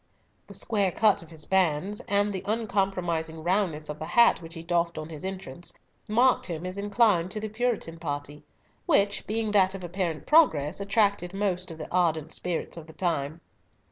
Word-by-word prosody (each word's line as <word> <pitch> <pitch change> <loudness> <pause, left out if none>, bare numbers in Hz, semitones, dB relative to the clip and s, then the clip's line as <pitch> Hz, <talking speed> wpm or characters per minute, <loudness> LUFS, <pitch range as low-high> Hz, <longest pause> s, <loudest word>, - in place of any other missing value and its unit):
The - - -7
square 200 -5 0
cut 215 +2 +3
of 165 - -14
his 160 -2 -5
bands, 190 +1 +1
and 205 +1 +2
the 190 - -3
uncompromising 185 -7 -1
roundness 175 -4 0
of 150 0 -6
the 155 - -5
hat 235 -5 +5
which 165 +1 -10
he 165 - -7
doffed 170 -1 0
on 155 0 -5
his 155 -3 -8
entrance, 185 -4 -6 0.3
marked 240 +4 +3
him 170 -1 -5
as 185 +2 -4
inclined 205 -4 +3
to 215 - -5
the 215 0 -4
Puritan 215 -7 -2
party, 145 -2 -5 0.4
which, 200 0 +2
being 220 0 -1
that 195 -2 +3
of 190 - -7
apparent 175 -2 -3
progress, 170 - +4
attracted 200 -2 +1
most 185 -3 -1
of 165 - -8
the - - -8
ardent 160 -3 +1
spirits 175 -1 -4
of 160 -1 -9
the 160 - -12
time. 160 -3 -2
180 Hz, 180 wpm, -27 LUFS, 160-205 Hz, 0.4 s, hat